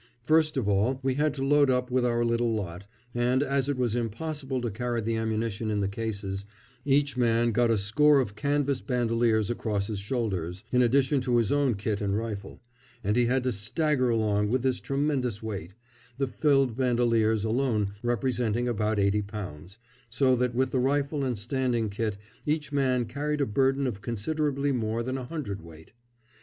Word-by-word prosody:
First 155 +2 +3
of 120 -6 0
all 105 +6 +1
we 135 -1 +1
had 150 +3 +1
to 135 -1 -2
load 145 0 +4
up 125 0 0
with 125 0 +2
our 120 -1 +1
little 115 0 +1
lot, 95 -1 -5 0.3
and, 125 +3 +2
as 140 -1 0
it 140 - -1
was 120 -3 0
impossible 135 +4 -3
to 120 -2 -2
carry 120 +2 -2
the 115 +1 -1
ammunition 110 -1 -2
in 105 -1 0
the 100 - +1
cases, 100 -2 -4 0.4
each 140 -1 +2
man 120 -1 +3
got 120 +1 +2
a 115 - +3
score 140 +9 +4
of 105 -6 -2
canvas 140 +2 0
bandoliers 115 -4 +1
across 105 -4 -1
his 105 -1 -4
shoulders, 100 -5 -3
in 125 - +4
addition 135 +3 +3
to 125 -1 +1
his 115 -3 +2
own 140 -5 +2
kit 105 +1 -2
and 100 0 0
rifle, 105 -2 -6 0.4
and 105 +1 +1
he 120 -1 +3
had 130 +1 +1
to 130 - +1
stagger 130 - 0
along 105 -2 +1
with 125 +2 0
this 130 -1 +1
tremendous 135 -6 -1
weight, 95 -4 -5 0.4
the 135 - +1
filled 135 0 +2
bandoliers 115 -4 +2
alone 110 -3 0
representing 120 -1 0
about 110 -2 0
eighty 100 +1 +2
pounds; 100 -3 -8 0.3
so 130 +2 +3
that 125 -1 0
with 130 +1 +1
the 130 - +1
rifle 140 +2 0
and 125 -4 -1
standing 120 0 -1
kit 105 0 -2 0.3
each 150 0 0
man 130 -4 +1
carried 145 +6 -2
a 140 - +2
burden 135 +4 +1
of 105 -6 -3
considerably 140 +6 -1
more 115 -2 -1
than 130 +2 -3
a 125 - -6
hundredweight. 100 - -7
120 Hz, 180 wpm, -27 LUFS, 110-135 Hz, 0.4 s, load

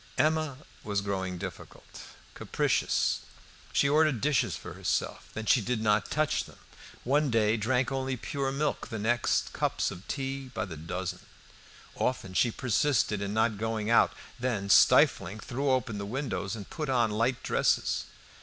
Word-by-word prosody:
Emma 155 -1 +1 0.3
was 100 -1 -1
growing 95 -2 -3
difficult, - - -9 0.3
capricious. - - 0 0.5
She 140 - +3
ordered 150 -3 +3
dishes 145 +3 +1
for - - -8
herself, - - -2
then 110 - -4
she 120 - +4
did 120 +2 -1
not 105 -1 +2
touch 155 -1 0
them; - - -15 0.5
one 145 +3 +2
day 110 -2 +3
drank 125 +5 0
only 130 -1 -2
pure 135 +2 -2
milk, 145 +2 -1
the 110 - -5
next 120 +3 +1
cups - - 0
of 90 +3 -10
tea 135 -1 -4
by - - -1
the 85 -4 -8
dozen. 90 +3 -4 0.7
Often 105 -7 -2
she 120 - +3
persisted 115 -3 +1
in 100 +1 -3
not 110 -2 +1
going 110 0 -1
out, 115 - +5 0.3
then, 110 -6 -1
stifling, 105 +1 +5
threw 135 +5 -2
open 120 -5 0
the 100 - -4
windows 120 -4 -3
and 100 -3 -8
put 155 -3 -5
on 120 -4 +2
light 115 +4 0
dresses. - - +1
115 Hz, 155 wpm, -29 LUFS, 105-135 Hz, 0.7 s, out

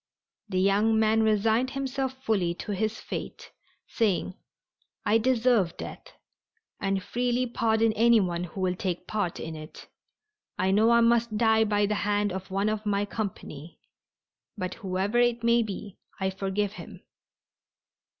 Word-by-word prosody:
The 185 - -2
young 205 +4 +3
man 220 0 +3
resigned 220 +3 +2
himself 270 -1 -3
fully 185 -7 +1
to 210 - -6
his 215 +2 -1
fate, - - -7 0.4
saying: 195 -4 0 0.7
"I 220 +2 +4
deserve 235 -6 +2
death, - - -9 0.6
and 195 -1 -1
freely 245 +2 0
pardon 225 -2 +1
anyone 210 -6 +3
who 180 +3 -7
will 185 -1 +1
take 180 -1 -3
part 205 -5 -2
in 160 0 -6
it. 155 0 -11 0.7
I 190 +1 +1
know 215 +3 +4
I 235 0 +5
must 235 -1 +2
die 220 -1 +4
by 205 -1 +2
the 210 - 0
hand 205 0 +1
of 190 +1 -6
one 195 +2 0
of 215 0 -1
my 205 -1 0
company, 175 -7 -6 0.8
but 185 -2 -3
whoever 195 +4 -1
it 240 -1 +2
may 235 0 +4
be 205 -2 -6 0.2
I 190 0 0
forgive 195 +1 -2
him." - - -11
210 Hz, 145 wpm, -27 LUFS, 190-230 Hz, 0.8 s, I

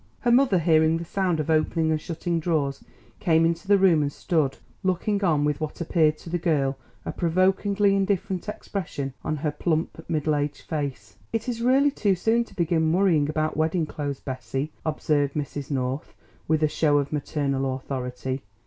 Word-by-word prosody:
Her 240 - +2
mother 250 -5 +5
hearing 160 -1 +4
the 170 - -5
sound 180 -2 0
of 155 +1 -1
opening 160 0 +2
and 155 -1 0
shutting 170 +1 -2
drawers 155 -4 -1 0.4
came 165 -1 +3
into 170 +3 -1
the 200 0 +6
room 185 -5 +4
and 145 -1 0
stood 145 -4 0 0.2
looking 200 +2 0
on 155 -5 +3
with 150 0 -1
what 155 -1 -4
appeared 155 -2 +2
to 165 - -11
the 175 - 0
girl 145 -6 +1 0.3
a - - -2
provokingly 195 +3 +2
indifferent 195 0 -1
expression 155 -10 -4
on 155 - -1
her 150 0 -1
plump 160 +1 -2
middle 155 -2 +1
aged 145 0 -2
face. 135 -10 -4
"It 225 +2 -2
is 235 -2 -2
really 270 +4 +4
too 205 -8 +1
soon 225 +6 +2
to - - -18
begin 165 -2 +1
worrying 170 -5 +3
about 155 0 -1
wedding 160 +1 +1
clothes, 145 -3 -4
Bessie," 130 +3 -4
observed 150 -2 0
Mrs. 145 -1 -4
North 130 0 -3 0.3
with 155 0 +2
a - - +5
show 150 -1 +2
of 140 +1 -1
maternal 140 -3 -1
authority. 130 0 -4
160 Hz, 175 wpm, -25 LUFS, 145-185 Hz, 0.4 s, the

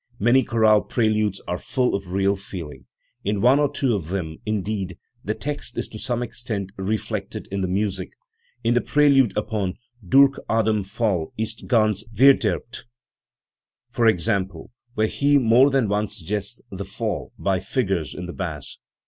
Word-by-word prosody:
Many 120 +5 +4
chorale 110 -3 +4
preludes 110 -4 0
are 90 - -2
full 125 -2 0
of 95 -2 -3
real 100 +1 +2
feeling; 80 -9 -8 0.4
in 100 0 0
one 125 +6 +5
or 145 -2 +2
two 130 -4 0
of 95 -7 -2
them, 85 -4 -3
indeed, 100 -3 -2 0.3
the 110 - -2
text 145 -4 -4
is - - -2
to 110 - -9
some 120 0 -1
extent 110 -5 -4
reflected 100 +2 -3
in 100 0 -2
the 95 - 0
music, 95 0 -2 0.2
* - - -44
~ 120 - -39
in 115 +1 +3
the 120 - +3
prelude 140 -8 +3
upon 105 -3 -1 0.3
"Durch 135 +9 +5
Adams 110 -3 +1
Fall 105 -8 0
ist 110 +1 -4
ganz 110 -4 +2
vcrderbt", 115 -3 +3 1.1
for 115 - +2
example, 95 -3 0 0.2
where 110 - +2
he 145 +6 +3
more 125 +2 +5
than 135 -5 +2
once 105 0 -1
suggests 95 +4 -4
the - - -5
"fall" - - -4
by 95 -2 0
figures 95 - -1
in 90 - -5
the 90 - -7
bass. 80 -7 -5
105 Hz, 165 wpm, -23 LUFS, 95-120 Hz, 1.1 s, one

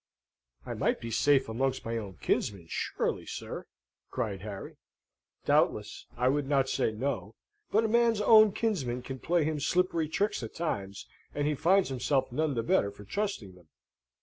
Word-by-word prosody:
"I - - -4
might - - 0
be 115 - -6
safe 135 +3 +3
amongst 130 +4 -1
my 115 0 -2
own 100 -6 -5
kinsmen, 95 +6 -1
surely, - - -2
sir!" - - -6 0.4
cried 105 -7 -3
Harry. 100 -2 -7 0.7
"Doubtless. - - +1
I 125 +2 +2
would 140 +1 +1
not 135 -2 +3
say 115 - +1
no. 110 -3 -3 0.3
But 220 +2 +3
a - - +2
man's 230 -1 +3
own 215 0 +7
kinsmen 135 - -1
can 130 0 -6
play 170 +3 +1
him 155 0 -1
slippery 165 0 +1
tricks 205 +3 0
at 115 - -7
times, 100 - -3 0.3
and 145 - 0
he 150 - +2
finds 185 +5 +3
himself 130 +1 0
none 150 +2 0
the 115 - 0
better 100 -3 +2
for 100 0 -12
trusting 155 - -3
them. 90 -3 -19
135 Hz, 170 wpm, -30 LUFS, 110-170 Hz, 0.7 s, own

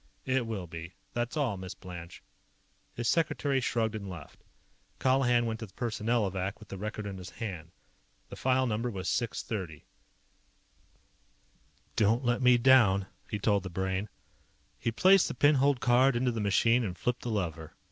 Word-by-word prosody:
"It 130 -2 0
will 105 -5 -4
be. 85 +1 -9 0.2
That's 120 +4 -2
all, 125 -9 0
Miss 95 0 -7
Blanche." 85 -2 -10 0.7
His 120 -1 -2
secretary 145 -4 +1
shrugged 115 -2 0
and 100 -3 -5
left. 90 - -10 0.6
Colihan 125 -2 +3
went 110 -1 -3
to 110 - -6
the 95 - -23
Personnelovac 105 -5 -1
with 110 - -14
the 100 - -6
record 105 +1 -4
in 100 -2 -6
his 90 0 -8
hand. 90 -8 -6 0.6
The - - -8
file 130 0 +2
number 115 +1 -1
was 95 -5 -5
630. 105 -8 -3 2.1
"Don't 115 +4 +2
let 120 +1 +1
me 125 -1 +6
down," 115 -7 +5 0.2
he 105 - -2
told 100 -1 +2
the 95 - -6
Brain. 95 +3 -2 0.7
He 115 - -1
placed 185 - +5
the - - -5
pin 145 +1 +5
holed 140 -1 +3
card 125 +2 +4
into 125 +1 +1
the 115 -2 -3
machine 115 +4 +3
and 90 -5 -4
flipped 125 +6 -1
the 120 - -4
lever. 85 -6 -3
110 Hz, 165 wpm, -30 LUFS, 95-125 Hz, 2.1 s, me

